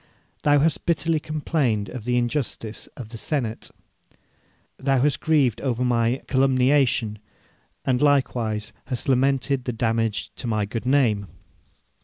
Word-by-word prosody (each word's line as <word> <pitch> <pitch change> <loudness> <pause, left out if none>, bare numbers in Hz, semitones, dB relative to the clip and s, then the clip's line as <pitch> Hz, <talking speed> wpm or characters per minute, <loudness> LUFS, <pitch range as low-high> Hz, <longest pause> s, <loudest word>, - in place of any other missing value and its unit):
Thou 145 0 +4
hast 150 +1 +1
bitterly 165 -1 +2
complained 145 -9 -1
of 120 -4 -8
the 125 0 +1
injustice 120 -3 -2
of 120 -5 -8
the 115 -1 -8
senate. 120 -7 -2 1.1
Thou 135 -1 +2
hast 145 +3 +2
grieved 140 -8 +2
over 125 -2 0
my 120 +1 +1
calumniation, 130 -4 +2 0.7
and 125 -2 +1
likewise 120 -7 +1
hast 125 -3 -3
lamented 135 0 +1
the 125 - -2
damage 115 -2 -1
to 125 - -4
my 110 -2 0
good 115 +4 -5
name. 115 -7 +2
125 Hz, 130 wpm, -24 LUFS, 115-140 Hz, 1.1 s, Thou